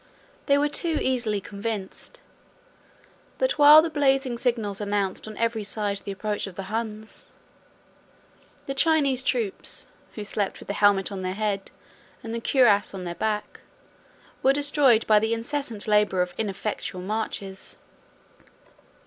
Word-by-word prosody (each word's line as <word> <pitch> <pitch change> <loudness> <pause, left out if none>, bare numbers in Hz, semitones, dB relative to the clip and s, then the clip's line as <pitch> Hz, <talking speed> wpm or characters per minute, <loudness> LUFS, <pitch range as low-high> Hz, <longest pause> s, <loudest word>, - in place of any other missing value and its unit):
They 280 -1 +5
were 290 +1 +2
too 320 +2 0
easily 235 -5 0
convinced, 205 - -5 1.2
that - - 0
while 300 +2 +9
the 330 - -1
blazing 270 -4 +1
signals 225 -5 -1
announced 200 -1 -1
on 215 -1 -8
every 230 -1 0
side 205 0 -2
the 200 - -6
approach 205 +1 -3
of 190 - -10
the 190 0 -7
Huns, 220 -1 -4 1.4
the 275 - -3
Chinese 280 -3 +3
troops, 235 -6 -2 0.3
who 210 - -5
slept 205 -1 -2
with - - -13
the - - 0
helmet 205 -1 +3
on 195 -1 -5
their 185 0 -3
head, 205 -2 -2 0.5
and 225 0 -5
the 230 - -3
cuirass 215 -7 +3
on 185 - -6
their 175 -1 -4
back, 210 +3 -3 0.8
were 270 - +4
destroyed 285 -5 +3
by 215 -1 +5
the 220 +2 0
incessant 235 -2 -3
labor 210 -3 +3
of 180 0 -7
ineffectual 200 -3 -4
marches. 195 -1 -4
215 Hz, 140 wpm, -25 LUFS, 200-260 Hz, 1.4 s, while